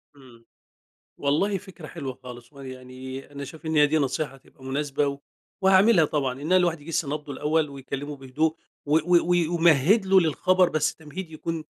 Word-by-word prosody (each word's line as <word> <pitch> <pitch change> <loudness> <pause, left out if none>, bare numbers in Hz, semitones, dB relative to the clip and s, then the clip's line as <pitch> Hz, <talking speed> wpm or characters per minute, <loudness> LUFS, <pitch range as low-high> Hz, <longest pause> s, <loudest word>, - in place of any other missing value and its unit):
إمم، 120 -4 -18 0.7
والله 160 +9 +1
فكرة 185 -5 -11
حلوة 135 -2 -6
خالص 125 +2 -11
وأنا 135 -1 -10
يعني 130 +1 -9
أنا 140 0 -7
شايف 160 +3 -12
إن 160 - -1
هي 150 -1 +6
دي 155 - +1
نصيحة 140 0 -2
تبقى 135 - -21
مناسبة 140 +2 -1
و 140 0 -4 0.4
وهاعملها 190 -2 +5
طبعًا 135 -3 -2
إن 160 +5 0
الواحد 175 -4 +2
يجِس 165 0 -2
نبضه 145 0 -5
الأول 150 +2 0
ويكلّمه 140 +1 -6
بهدوء 145 +4 -1 0.3
و 150 +1 +2
و - - +1 0.3
وي 175 -2 +3
ويمهِّد 170 - +4
له 190 0 +6
للخبر، 185 +3 +2
بس 155 -2 +1
التمهيد 160 +2 -9
يكون 160 +1 -4
150 Hz, 175 wpm, -25 LUFS, 135-165 Hz, 0.7 s, هي